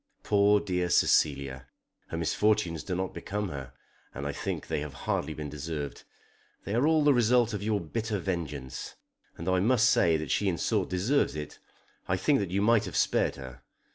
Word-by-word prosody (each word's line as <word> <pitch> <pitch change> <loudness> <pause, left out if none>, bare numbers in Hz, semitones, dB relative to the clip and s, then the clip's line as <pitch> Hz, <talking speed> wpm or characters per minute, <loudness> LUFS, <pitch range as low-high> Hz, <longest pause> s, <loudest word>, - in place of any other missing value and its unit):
Poor 105 0 +4
dear 90 -3 -1
Cecilia! 70 -5 +2 0.4
her 85 - -5
misfortunes 90 0 +1
do 90 - -3
not 95 +1 -3
become 105 0 -3
her, 65 -5 -7 0.4
and 70 - -5
I 70 - -1
think - - -4
they - - -2
have 75 -1 -6
hardly 80 +2 -2
been 75 -1 -5
deserved. 75 0 -5 0.6
They 100 - -4
are 125 +6 +3
all 160 -1 +4
the 145 -1 +5
result 120 -1 +3
of 105 - -3
your 105 0 0
bitter 110 +5 -3
vengeance, 75 -8 -4 0.4
and 85 - -7
though 95 - +1
I 95 - +3
must 120 +4 +4
say 85 -10 +4
that 75 -3 -4
she 105 - +1
in 85 - -1
sort - - 0
deserves 95 - +1
it, 75 -1 -7 0.5
I 95 - +1
think 145 +8 +2
that 100 -4 -2
you 100 +3 0
might 115 -1 +4
have - - -4
spared - - +2
her. 65 -1 -10
90 Hz, 195 wpm, -29 LUFS, 75-105 Hz, 0.6 s, the